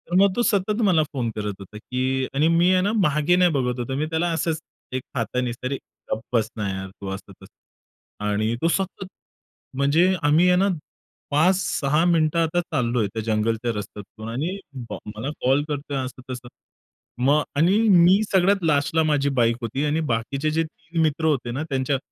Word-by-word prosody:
तर 175 Hz, -, -2 dB
मग 200 Hz, -2 st, +3 dB
तो 240 Hz, -, +1 dB
सतत 210 Hz, 0 st, +1 dB
मला 180 Hz, -6 st, +4 dB
फोन 130 Hz, -6 st, -3 dB
करत 105 Hz, -1 st, -3 dB
होता 100 Hz, +2 st, -11 dB
की 130 Hz, +3 st, -1 dB
आणि 150 Hz, +3 st, +3 dB
मी 170 Hz, +2 st, +4 dB
आहे 185 Hz, -, +3 dB
ना 200 Hz, +3 st, +1 dB
मागे 150 Hz, +1 st, +3 dB
नाही 180 Hz, -1 st, +4 dB
बघत 125 Hz, -4 st, -1 dB
होतो 125 Hz, +2 st, -3 dB
मी 150 Hz, +3 st, 0 dB
त्याला 165 Hz, +2 st, 0 dB
असंच 160 Hz, 0 st, -1 dB, 0.4 s
एक -, -, -4 dB
हाताने 125 Hz, +1 st, -1 dB
तरी 130 Hz, +2 st, -1 dB, 0.4 s
"गप्प 110 Hz, -, -1 dB
बस 110 Hz, -1 st, +2 dB
ना 105 Hz, -2 st, -2 dB
यार 95 Hz, 0 st, -5 dB
तू" 100 Hz, -, -5 dB
असं-तसं. 95 Hz, 0 st, -9 dB, 0.7 s
आणि 105 Hz, +2 st, 0 dB
तो 165 Hz, -, +3 dB
सतत, 190 Hz, +2 st, -1 dB, 0.7 s
म्हणजे 160 Hz, +7 st, +3 dB
आम्ही 155 Hz, +5 st, +4 dB
आहे 180 Hz, -, +5 dB
ना 195 Hz, +2 st, +3 dB, 0.6 s
5-6 155 Hz, -2 st, +2 dB
मिनिटं 165 Hz, -2 st, +2 dB
आता 165 Hz, +1 st, +1 dB
चाललोय 120 Hz, -8 st, 0 dB
त्या 110 Hz, -, -2 dB
जंगलच्या 115 Hz, +2 st, 0 dB
रस्त्यातून 105 Hz, +2 st, -8 dB
आणि 155 Hz, +11 st, -2 dB, 0.3 s
बा -, -, -4 dB, 0.2 s
मला 110 Hz, +6 st, -4 dB, 0.2 s
कॉल 135 Hz, +3 st, +3 dB
करतोय 145 Hz, -1 st, -3 dB
असं-तसं. 130 Hz, -1 st, -8 dB, 0.8 s
मग 145 Hz, +3 st, +4 dB
आणि 170 Hz, +7 st, +4 dB
मी 185 Hz, +2 st, +6 dB
सगळ्यात 195 Hz, 0 st, +3 dB
लास्टला 155 Hz, +1 st, +2 dB
माझी 145 Hz, -2 st, +1 dB
बाईक 115 Hz, 0 st, +3 dB
होती 120 Hz, +5 st, -2 dB
आणि 150 Hz, +2 st, +1 dB
बाकीचे 135 Hz, +6 st, -1 dB
जे 165 Hz, +1 st, +1 dB
3 165 Hz, +1 st, -5 dB
मित्र 160 Hz, 0 st, +1 dB
होते 135 Hz, -6 st, +1 dB
ना, 135 Hz, +6 st, -3 dB
त्यांच्या 135 Hz, 0 st, 0 dB
145 Hz, 175 wpm, -23 LUFS, 120-170 Hz, 0.8 s, मी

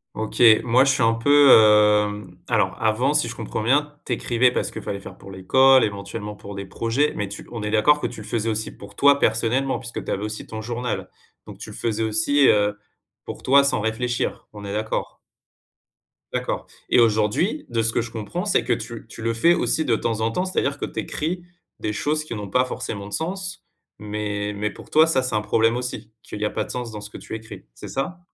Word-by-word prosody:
OK, 110 Hz, +2 st, -3 dB, 0.2 s
moi, 125 Hz, +2 st, +4 dB
je 135 Hz, -, +3 dB
suis 130 Hz, -, +1 dB
un 115 Hz, 0 st, +4 dB
peu, 140 Hz, +4 st, +5 dB
hem 105 Hz, -3 st, +4 dB
alors, 105 Hz, -6 st, +1 dB
avant, 115 Hz, +6 st, +2 dB
si 120 Hz, -, +2 dB
je 115 Hz, -, -6 dB
comprends 110 Hz, 0 st, -4 dB
bien, 145 Hz, +5 st, +1 dB
tu 125 Hz, -, -1 dB
écrivais 120 Hz, +1 st, +2 dB
parce -, -, -2 dB
qu'il -, -, -7 dB
fallait 100 Hz, -, -4 dB
faire -, -, -11 dB
pour -, -, -13 dB
l'école, 130 Hz, +8 st, +5 dB
éventuellement, 105 Hz, +1 st, -4 dB
pour 100 Hz, -1 st, -10 dB
des 100 Hz, 0 st, -5 dB
projets. 115 Hz, +9 st, 0 dB
Mais 105 Hz, -, -2 dB
tu 100 Hz, -, -9 dB
on 115 Hz, -2 st, -5 dB
est 105 Hz, -, -2 dB
d'accord 110 Hz, +8 st, +4 dB
que -, -, 0 dB
tu 115 Hz, -, -9 dB
le 105 Hz, -, -10 dB
faisais 115 Hz, -1 st, -1 dB
aussi 110 Hz, 0 st, -2 dB
pour 100 Hz, 0 st, -13 dB
toi, 140 Hz, 0 st, +5 dB
personnellement, 120 Hz, +4 st, +1 dB
puisque 120 Hz, -, -7 dB
tu -, -, -5 dB
avais 100 Hz, -, -2 dB
aussi 110 Hz, 0 st, -5 dB
ton 110 Hz, 0 st, -6 dB
journal. 120 Hz, +2 st, -4 dB, 0.4 s
Donc, -, -, -11 dB
tu -, -, -8 dB
le -, -, -9 dB
faisais 115 Hz, -1 st, -1 dB
aussi, 110 Hz, +6 st, +3 dB
heu, 105 Hz, 0 st, +3 dB, 0.5 s
pour -, -, -8 dB
toi, 140 Hz, +2 st, +5 dB
sans 140 Hz, -, +1 dB
réfléchir, 120 Hz, +2 st, -2 dB
on 105 Hz, -1 st, -9 dB
est 100 Hz, -, -5 dB
d'accord? 110 Hz, +1 st, -3 dB, 1.2 s
D'accord. -, -, -3 dB, 0.2 s
Et -, -, +4 dB
aujourd'hui, 115 Hz, -, +2 dB
de 115 Hz, -2 st, 0 dB
ce 115 Hz, 0 st, 0 dB
que -, -, +1 dB
je 115 Hz, 0 st, -7 dB
comprends, 110 Hz, -3 st, -4 dB
c'est -, -, +2 dB
que -, -, +2 dB
tu -, -, -6 dB
tu -, -, -11 dB
le 115 Hz, +1 st, 0 dB
fais 165 Hz, +10 st, +4 dB
aussi, 160 Hz, -2 st, 0 dB
de 120 Hz, -5 st, +2 dB
temps 110 Hz, 0 st, -2 dB
en 115 Hz, +1 st, +1 dB
temps. 180 Hz, -, -1 dB
C'est-à-dire 140 Hz, -6 st, -1 dB
que -, -, -3 dB
tu -, -, -6 dB
écris 170 Hz, +3 st, -3 dB, 0.4 s
des 105 Hz, -, -2 dB
choses 150 Hz, +7 st, -1 dB
qui 120 Hz, -, -6 dB
n'ont 105 Hz, -2 st, -6 dB
pas 125 Hz, +5 st, +2 dB
forcément 100 Hz, -5 st, -5 dB
de 105 Hz, -, -10 dB
sens, 185 Hz, +2 st, -4 dB, 0.3 s
mais 105 Hz, -1 st, -3 dB
mais 105 Hz, +1 st, -2 dB
pour 100 Hz, -, -13 dB
toi, 155 Hz, +1 st, +5 dB
ça, 135 Hz, -5 st, +2 dB
c'est 130 Hz, -3 st, -2 dB
un 105 Hz, -, +1 dB
problème 115 Hz, +2 st, +2 dB
aussi 125 Hz, -3 st, -5 dB
qu'il 105 Hz, -, -8 dB
y -, -, +1 dB
a -, -, +1 dB
pas 110 Hz, -, -3 dB
de -, -, -8 dB
sens 120 Hz, -2 st, -5 dB
dans 105 Hz, -, -7 dB
ce 105 Hz, -, -9 dB
que -, -, -10 dB
tu -, -, -10 dB
écris. 110 Hz, 0 st, -10 dB
C'est -, -, -10 dB
ça? 175 Hz, +7 st, -4 dB
115 Hz, 235 wpm, -23 LUFS, 105-130 Hz, 1.2 s, peu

